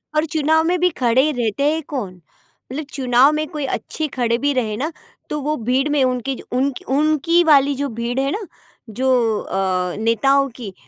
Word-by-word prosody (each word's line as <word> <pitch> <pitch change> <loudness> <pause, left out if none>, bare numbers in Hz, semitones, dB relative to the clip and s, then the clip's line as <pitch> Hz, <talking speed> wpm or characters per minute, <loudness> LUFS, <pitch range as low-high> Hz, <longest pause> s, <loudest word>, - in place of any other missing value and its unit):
और 305 +1 +2
चुनाव 315 +1 +3
में 350 +2 +1
भी 360 +1 +3
खड़े 260 +5 +3
रहते 240 -1 -1
हैं 320 - -2
कौन, 195 - -5 0.5
उल 295 +4 -4
चुनाव 255 +1 +4
में 305 0 -1
कोई 300 -4 -4
अच्छे 315 - -5
खड़े 235 -1 +1
भी 285 +3 0
रहे 225 -5 -1
ना, 300 +7 -2 0.4
तो 300 - -2
वो 300 +2 -1
भीड़ 265 +3 +2
में 290 -2 +2
उनकी 255 +1 -1
ज - - -10
उन 270 +2 +1 0.2
उनकी 310 +3 +3
वाली 285 -3 +4
जो 280 +1 -2
भीड़ 235 +2 -3
है 275 +1 0
ना, 420 - -3 0.5
जो 260 +5 0 0.3
अ, 185 -2 -1
नेताओं 270 +5 +2
की, 215 -6 -8
270 Hz, 190 wpm, -20 LUFS, 240-300 Hz, 0.5 s, चुनाव